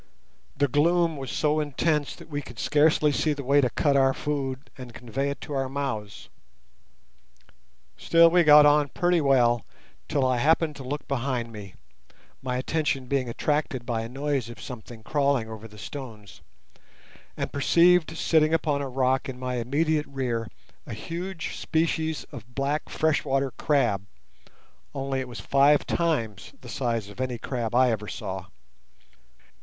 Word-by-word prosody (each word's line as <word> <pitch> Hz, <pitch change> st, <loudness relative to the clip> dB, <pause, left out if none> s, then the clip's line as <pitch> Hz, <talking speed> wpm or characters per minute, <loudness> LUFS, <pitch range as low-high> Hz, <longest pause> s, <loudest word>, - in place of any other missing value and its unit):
The 145 Hz, +1 st, +3 dB
gloom 165 Hz, +4 st, +2 dB
was 135 Hz, -3 st, -6 dB
so 150 Hz, 0 st, +1 dB
intense 150 Hz, 0 st, 0 dB
that -, -, -13 dB
we 145 Hz, -2 st, -4 dB
could 120 Hz, -4 st, -12 dB
scarcely 150 Hz, +2 st, +3 dB
see 150 Hz, +2 st, +1 dB
the 140 Hz, -1 st, -6 dB
way 140 Hz, +2 st, +4 dB
to 125 Hz, -, +2 dB
cut 140 Hz, +4 st, +1 dB
our 135 Hz, -1 st, +4 dB
food 135 Hz, -2 st, -3 dB
and 125 Hz, -3 st, -10 dB
convey 125 Hz, +4 st, -3 dB
it 140 Hz, -, -5 dB
to 150 Hz, -, -7 dB
our 135 Hz, -1 st, -1 dB
mouths. 130 Hz, -7 st, -4 dB, 1.7 s
Still 165 Hz, 0 st, +5 dB
we 175 Hz, 0 st, +5 dB
got 150 Hz, -1 st, +8 dB
on 145 Hz, -1 st, +4 dB
pretty 175 Hz, +1 st, +1 dB
well, 120 Hz, -5 st, +3 dB, 0.4 s
till 140 Hz, -3 st, +1 dB
I 130 Hz, -1 st, +2 dB
happened 155 Hz, +3 st, +2 dB
to 135 Hz, -, -8 dB
look 140 Hz, +2 st, -5 dB
behind 125 Hz, -3 st, -2 dB
me—my 100 Hz, -, -9 dB
attention 135 Hz, 0 st, -1 dB
being 130 Hz, -1 st, -1 dB
attracted 140 Hz, -1 st, -1 dB
by 115 Hz, -2 st, -1 dB
a 115 Hz, -, -6 dB
noise 135 Hz, -2 st, -2 dB
of 120 Hz, -, -10 dB
something 115 Hz, -2 st, -9 dB
crawling 140 Hz, -3 st, +1 dB
over 110 Hz, 0 st, -8 dB
the 105 Hz, -1 st, -16 dB
stones, 110 Hz, -5 st, -9 dB, 1.0 s
and -, -, -3 dB
perceived 170 Hz, +3 st, +4 dB
sitting 160 Hz, -1 st, +3 dB
upon 145 Hz, -3 st, 0 dB
a 140 Hz, -, -4 dB
rock 130 Hz, +1 st, 0 dB
in 130 Hz, -, -6 dB
my 125 Hz, 0 st, -3 dB
immediate 150 Hz, +5 st, 0 dB
rear 125 Hz, -4 st, -2 dB, 0.4 s
a -, -, -5 dB
huge 170 Hz, -, -5 dB
species 160 Hz, -1 st, -1 dB
of 125 Hz, -4 st, -11 dB
black 140 Hz, +2 st, -1 dB
freshwater 140 Hz, -3 st, 0 dB
crab, 115 Hz, -11 st, 0 dB, 0.9 s
only 135 Hz, -1 st, -2 dB
it 130 Hz, -, -4 dB
was 120 Hz, -2 st, -8 dB
five 140 Hz, +1 st, +4 dB
times 115 Hz, -, -1 dB
the 120 Hz, -, -11 dB
size 115 Hz, -2 st, -2 dB
of 100 Hz, +5 st, -8 dB
any 125 Hz, -2 st, -2 dB
crab 120 Hz, -2 st, -3 dB
I 125 Hz, 0 st, +5 dB
ever 105 Hz, -2 st, -3 dB
saw. 95 Hz, -2 st, -6 dB
135 Hz, 155 wpm, -26 LUFS, 120-150 Hz, 1.7 s, got